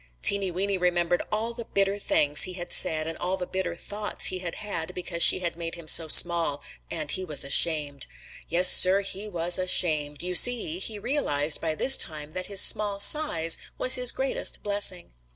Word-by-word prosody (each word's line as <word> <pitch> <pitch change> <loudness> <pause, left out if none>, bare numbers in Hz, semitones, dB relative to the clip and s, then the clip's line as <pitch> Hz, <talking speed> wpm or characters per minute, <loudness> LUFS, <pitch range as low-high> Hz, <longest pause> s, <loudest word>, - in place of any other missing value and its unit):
Teeny 200 -1 +2
Weeny 190 +2 -5
remembered 175 -1 -3
all 220 +2 -4
the 235 0 -10
bitter 200 +1 -2
things 150 -6 0
he 185 - +1
had 175 -1 -10
said 155 -1 +2
and 165 0 -8
all 185 +2 -5
the 180 - -7
bitter 180 -2 -7
thoughts 205 +4 -3
he 185 - -3
had 175 -2 -9
had 185 -4 -8
because 175 -1 -6
she - - +6
had 170 -2 -6
made 165 0 -9
him 170 -2 -15
so 160 +1 +5
small, 165 -3 +4 0.3
and 155 -3 -7
he 190 - -5
was 155 -5 -1
ashamed. 145 0 -1 0.4
Yes, 180 +2 +3
Sir, 185 +2 +6
he 200 +1 -6
was 175 -2 +1
ashamed. 155 -5 -2
You 180 0 -6
see, 200 -5 +4
he 210 +2 -4
realized 160 - -2
by 160 -1 -5
this 265 - +5
time 155 -1 -1
that 185 0 -7
his 200 -1 -1
small 205 -2 +1
size 185 - +3 0.2
was 255 - +1
his 250 -2 +4
greatest 265 0 -4
blessing. 200 -3 -1
180 Hz, 190 wpm, -23 LUFS, 165-200 Hz, 0.4 s, she